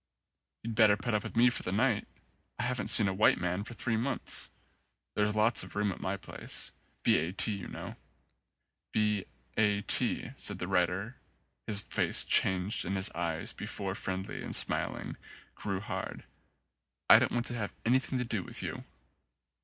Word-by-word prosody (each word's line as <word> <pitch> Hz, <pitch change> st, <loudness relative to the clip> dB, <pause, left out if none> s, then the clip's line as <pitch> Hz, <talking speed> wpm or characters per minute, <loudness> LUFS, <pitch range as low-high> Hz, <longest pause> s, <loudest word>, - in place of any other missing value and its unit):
"You'd 115 Hz, 0 st, -4 dB
better 110 Hz, -2 st, +5 dB
put 120 Hz, 0 st, -3 dB
up 105 Hz, -, +2 dB
with 115 Hz, +2 st, -8 dB
me 120 Hz, +2 st, +5 dB
for -, -, -1 dB
the 90 Hz, -, -4 dB
night. 110 Hz, +1 st, +1 dB, 0.5 s
I 120 Hz, -, -2 dB
haven't 125 Hz, +1 st, -1 dB
seen 105 Hz, -, +5 dB
a 95 Hz, -, 0 dB
white 100 Hz, +3 st, +4 dB
man 90 Hz, +2 st, -2 dB
for 120 Hz, -, -8 dB
three 115 Hz, -2 st, -1 dB
months. 125 Hz, +5 st, +1 dB, 0.6 s
There's 105 Hz, 0 st, +1 dB
lots 110 Hz, 0 st, +4 dB
of 90 Hz, -1 st, -7 dB
room 105 Hz, -1 st, +1 dB
at -, -, -8 dB
my 100 Hz, +1 st, -2 dB
place. -, -, -2 dB, 0.3 s
B. -, -, +4 dB
A. 80 Hz, +3 st, -2 dB
T. 100 Hz, +3 st, +2 dB
you 100 Hz, -3 st, -5 dB
know." -, -, -7 dB, 1.0 s
"B. 105 Hz, -2 st, +1 dB, 0.3 s
A. 105 Hz, -2 st, +2 dB
T.," 120 Hz, +2 st, +2 dB
said 105 Hz, -7 st, 0 dB
the 90 Hz, -, -4 dB
rider. 95 Hz, +6 st, 0 dB, 0.5 s
His 105 Hz, -1 st, +3 dB
face -, -, +2 dB
changed 95 Hz, +2 st, +2 dB
and 95 Hz, +3 st, -2 dB
his 95 Hz, +3 st, -1 dB
eyes, 85 Hz, -1 st, -2 dB
before -, -, -4 dB
friendly 95 Hz, 0 st, -4 dB
and -, -, -4 dB
smiling, -, -, 0 dB, 0.4 s
grew 100 Hz, -2 st, -3 dB
hard. 105 Hz, -, -5 dB, 0.8 s
"I -, -, +9 dB
don't -, -, +1 dB
want 120 Hz, 0 st, 0 dB
to 120 Hz, -, -4 dB
have 105 Hz, -3 st, -4 dB
anything 130 Hz, +2 st, +2 dB
to 125 Hz, -, -1 dB
do 110 Hz, -4 st, -2 dB
with -, -, -7 dB
you." -, -, -5 dB
105 Hz, 175 wpm, -31 LUFS, 95-115 Hz, 1.0 s, I